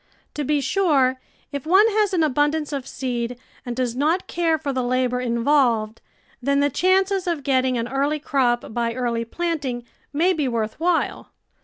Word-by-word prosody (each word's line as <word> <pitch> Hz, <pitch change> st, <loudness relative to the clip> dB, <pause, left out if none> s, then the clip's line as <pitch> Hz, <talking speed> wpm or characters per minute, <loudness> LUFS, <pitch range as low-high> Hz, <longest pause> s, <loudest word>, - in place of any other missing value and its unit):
To 295 Hz, -, -3 dB
be 290 Hz, +1 st, +1 dB
sure, 275 Hz, -6 st, +2 dB, 0.3 s
if 280 Hz, -2 st, -4 dB
one 380 Hz, +5 st, +6 dB
has 420 Hz, -1 st, +1 dB
an 350 Hz, -4 st, +2 dB
abundance 295 Hz, +1 st, +1 dB
of 270 Hz, -2 st, -4 dB
seed 245 Hz, -2 st, -3 dB, 0.3 s
and 245 Hz, -2 st, -5 dB
does 245 Hz, -2 st, -1 dB
not 315 Hz, +7 st, +1 dB
care 330 Hz, -2 st, 0 dB
for 290 Hz, -3 st, -3 dB
the 260 Hz, -, 0 dB
labour 250 Hz, 0 st, 0 dB
involved, 235 Hz, -3 st, +1 dB, 0.4 s
then 280 Hz, +2 st, +1 dB
the 285 Hz, 0 st, +2 dB
chances 380 Hz, +3 st, +2 dB
of 335 Hz, -5 st, -1 dB
getting 260 Hz, -2 st, +1 dB
an 230 Hz, 0 st, -2 dB
early 280 Hz, +3 st, 0 dB
crop 250 Hz, -6 st, 0 dB
by 235 Hz, 0 st, -1 dB
early 235 Hz, -2 st, -1 dB
planting 285 Hz, -4 st, -3 dB, 0.3 s
may 335 Hz, +6 st, +2 dB
be 300 Hz, -5 st, -1 dB
worth 225 Hz, -1 st, -2 dB
while. 345 Hz, +1 st, 0 dB
275 Hz, 170 wpm, -22 LUFS, 245-320 Hz, 0.4 s, one